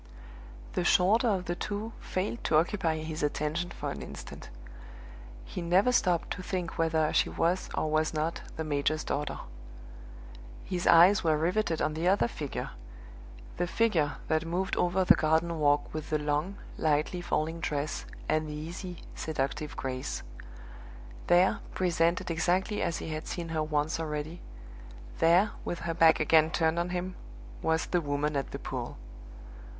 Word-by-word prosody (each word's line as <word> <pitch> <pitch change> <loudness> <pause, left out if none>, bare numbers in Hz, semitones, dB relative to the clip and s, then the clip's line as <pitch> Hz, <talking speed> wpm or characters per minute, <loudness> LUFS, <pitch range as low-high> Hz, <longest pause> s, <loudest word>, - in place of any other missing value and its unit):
The - - 0
shorter 200 +7 +4
of 190 -4 +1
the 175 - -1
two 210 +5 -4
failed 200 +5 -3
to 155 - +4
occupy 165 -2 +1
his 155 0 -4
attention 150 +4 -1
for - - -5
an - - -6
instant; - - -9 1.0
he 180 - -6
never 185 +8 +3
stopped 180 -8 +2
to 185 - -3
think 180 -3 -4
whether 160 -1 +2
she - - +3
was 175 +3 0
or - - 0
was 155 0 +2
not 155 +1 -2
the 160 - -3
major's 155 +1 0
daughter. 145 +1 -2 1.3
His 180 -1 -2
eyes 180 +5 +7
were 160 -2 +3
riveted 170 +1 0
on 155 - 0
the 160 +3 -1
other 195 +5 +4
figure 150 - -5 0.9
the 175 - 0
figure 170 -8 +1
that 155 0 +1
moved 180 +3 -1
over 180 +1 +2
the - - +8
garden 160 +1 +1
walk 145 -1 +2
with 155 0 -5
the 155 - +2
long, 150 +6 -1 0.2
lightly 155 +3 +1
falling 165 -1 -1
dress 150 -2 -2 0.2
and 155 0 +1
the - - -5
easy, 170 +3 -7
seductive 150 0 -3
grace. 130 +1 -3 1.0
There, 180 +2 +4 0.2
presented 175 0 +1
exactly 180 +5 +1
as 170 -1 0
he - - -6
had 155 0 -4
seen 170 -2 -4
her 160 -1 -1
once 155 +1 0
already 155 +1 -4 0.8
there, 175 +6 +5
with 175 - -4
her 170 -1 -2
back 165 -1 +5
again 155 0 +5
turned 160 0 +1
on 175 +1 -1
him, 180 +1 -3 0.5
was 160 0 +1
the 175 - 0
Woman 145 0 -1
at 140 - -1
the - - -5
pool! - - -5
165 Hz, 155 wpm, -29 LUFS, 155-180 Hz, 1.3 s, the